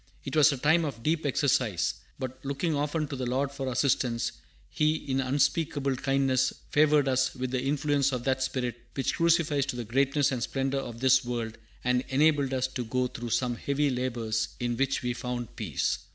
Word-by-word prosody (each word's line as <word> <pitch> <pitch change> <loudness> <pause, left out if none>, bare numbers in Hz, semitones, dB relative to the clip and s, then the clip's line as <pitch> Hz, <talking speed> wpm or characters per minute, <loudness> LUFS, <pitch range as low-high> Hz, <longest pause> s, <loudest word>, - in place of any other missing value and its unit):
It - - -4
was 155 0 +6
a 140 - -2
time 160 +6 +3
of 125 -7 -5
deep 155 -1 +1
exercise; 125 - +1 0.2
but 130 -1 -6
looking 140 +4 -1
often 150 +2 -1
to 140 - -4
the 130 -2 -3
Lord 135 +3 0
for 135 -1 -5
assistance, 120 -2 +1 0.4
He 155 0 +1
in 135 -3 -1
unspeakable 140 +1 +1
kindness 135 -1 +1 0.2
favored 150 -1 +4
us 130 0 +1
with 130 -1 -3
the 130 -1 0
influence 140 0 +1
of 125 -2 -3
that 130 0 0
spirit 125 -2 -1 0.2
which 135 - 0
crucifies 165 -4 +2
to 135 - -3
the 120 -1 -4
greatness 135 +4 +2
and 125 -2 -2
splendor 135 +3 -1
of 120 -3 -7
this 130 0 +5
world, 120 -2 -4 0.2
and 125 0 +2
enabled 140 0 +3
us 130 -1 0
to 125 - -4
go 125 +2 0
through 120 -1 -5
some 120 +1 0
heavy 140 +2 0
labors, 115 -3 -1
in 120 -1 -1
which 135 +1 0
we 125 0 0
found 120 -1 -5
peace." - - -1
135 Hz, 190 wpm, -28 LUFS, 125-145 Hz, 0.4 s, was